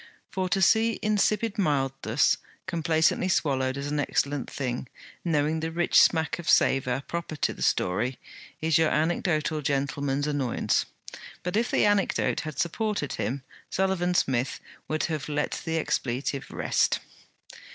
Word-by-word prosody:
For 185 -1 -2
to 195 +1 +2
see 225 +4 +4
insipid 215 +1 +1
mildness 135 - +1 0.3
complacently 165 0 +1
swallowed 130 -6 +1
as 140 - -4
an 145 +1 -1
excellent 140 -2 -1
thing, 125 -2 -4 0.3
knowing 155 -1 +1
the 160 +1 -2
rich 170 +1 +4
smack 160 0 +2
of 170 - -4
savour 130 0 +3
proper 170 -2 -4
to - - 0
the - - -12
story, 110 +8 +1 0.4
is 160 0 +3
your 160 -1 +4
anecdotal 155 -1 0
gentleman's 140 0 -1
annoyance. 145 -5 0 0.6
But 180 +2 -2
if 235 +3 +1
the - - +3
anecdote 205 -2 +2
had 155 -2 -6
supported 200 -3 -1
him, 130 +3 -3 0.3
Sullivan 185 -2 0
Smith 130 -4 +1 0.3
would 155 -1 -1
have 155 -3 -2
let 150 0 -1
the 165 0 -1
expletive 135 -2 -2
rest. - - +1
155 Hz, 140 wpm, -27 LUFS, 140-175 Hz, 0.6 s, see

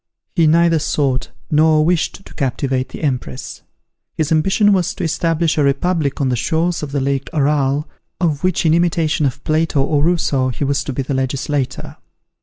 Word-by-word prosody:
He 165 -3 +4
neither 165 +1 +4
sought 140 -4 -1 0.2
nor 155 0 +4
wished 175 +3 -1
to - - -13
captivate 130 -1 -1
the - - -9
Empress. 125 - -3 0.6
His 155 -1 -1
ambition 195 +6 +3
was 180 -3 0
to 190 - -5
establish 165 0 0
a - - +3
republic 140 +1 0
on 135 -2 +1
the 125 - +1
shores 165 +8 0
of 150 -2 -5
the 140 - -1
lake 135 0 -1
Aral, 145 0 +1 0.3
of 160 -4 0
which 185 -2 +1
in 160 - +4
imitation 165 -3 +1
of 135 +1 -6
Plato 155 -1 +1
or 145 +2 +1
Rousseau, 150 -6 +1
he 125 +3 -4
was 140 0 0
to 140 - -3
be 135 - -2
the 135 - -3
legislator. 135 +1 -2
150 Hz, 180 wpm, -18 LUFS, 135-165 Hz, 0.6 s, He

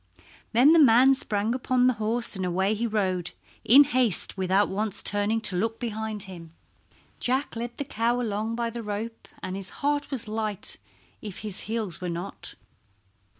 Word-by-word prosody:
Then 255 +7 +6
the 335 - +6
man 260 -1 +6
sprang 215 -4 -1
upon 255 0 +1
the 255 - +4
horse 225 +1 -1
and 190 - -4
away 190 +3 +1
he 230 +2 -1
rode 190 -5 -1 0.3
in 270 +6 +8
haste 250 -7 +1
without 190 +1 +2
once 205 +1 -2
turning 205 +2 +2
to 195 - +2
look 225 +5 -1
behind 220 -3 -4
him. 170 -4 -11 0.6
Jack 260 +3 -1
led 240 +1 -5
the 285 - -4
cow 235 -1 0
along 220 -1 -2
by 235 0 -2
the 235 +1 -5
rope, 220 +2 -6 0.2
and 185 0 -4
his 195 -1 -6 0.2
heart 290 0 0
was 260 -6 -2
light 215 -2 -1 0.4
if 205 -4 -8
his 210 -3 -2
heels 220 -6 -3
were 180 - -3
not. 175 +3 -7
220 Hz, 170 wpm, -26 LUFS, 200-240 Hz, 0.6 s, in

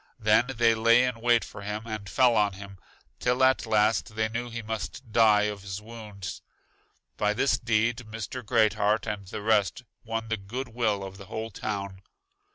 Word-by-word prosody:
Then 110 +1 +3
they 115 -1 +4
lay 115 +2 +5
in 125 -3 -2
wait 120 -1 +3
for - - -10
him, 105 +2 -4
and 110 -3 -6
fell 120 +5 +4
on 105 -2 +2
him, 100 0 -11 0.4
till 125 +1 +1
at 130 -2 +3
last 110 +1 +2
they 110 0 0
knew 120 +2 -4
he 115 0 -6
must 110 +2 -6
die 105 -2 +5
of 105 -1 -2
his 95 0 -5
wounds. 105 -3 -8 0.8
By 105 0 +1
this 135 - +2
deed 115 0 +1
Mr. 115 +2 -6
Great 110 0 +3
heart 105 0 +1
and 105 -3 -4
the 100 - -6
rest 110 +2 +2 0.2
won 115 0 -3
the 115 - 0
good 120 +7 -6
will 110 -4 0
of 95 0 -8
the 100 - -10
whole 110 +1 -5
town. 100 -1 -5
110 Hz, 185 wpm, -27 LUFS, 105-115 Hz, 0.8 s, lay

